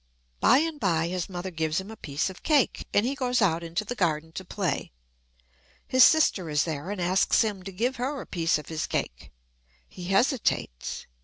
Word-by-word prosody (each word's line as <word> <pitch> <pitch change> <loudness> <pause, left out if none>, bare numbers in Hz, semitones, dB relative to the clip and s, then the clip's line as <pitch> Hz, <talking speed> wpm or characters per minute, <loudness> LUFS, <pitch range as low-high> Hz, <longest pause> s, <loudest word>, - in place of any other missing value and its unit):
By 255 - +6
and 315 0 -1
by 170 -5 +1
his 180 0 -3
mother 185 0 -5
gives 160 0 -1
him 190 +3 -8
a - - -8
piece 150 -2 -2
of 185 - -14
cake, 295 -6 +1
and 205 - +3
he 265 - 0
goes 250 -3 0
out 170 -6 +2
into 170 +5 -3
the 240 - -3
garden 160 -7 -1
to 190 - -6
play. 185 -2 -3 0.9
His 255 -1 +5
sister 225 - +4
is 150 -1 +2
there 160 +1 -4
and 205 -1 -4
asks 185 +6 +3
him 205 -4 -3
to 195 +1 -7
give 240 +8 -1
her 270 +3 -2
a - - -7
piece 165 -3 +1
of 150 - -9
his 160 -1 -3
cake. - - -4 0.6
He 180 - -10
hesitates. 195 - 0
185 Hz, 200 wpm, -27 LUFS, 165-240 Hz, 0.9 s, By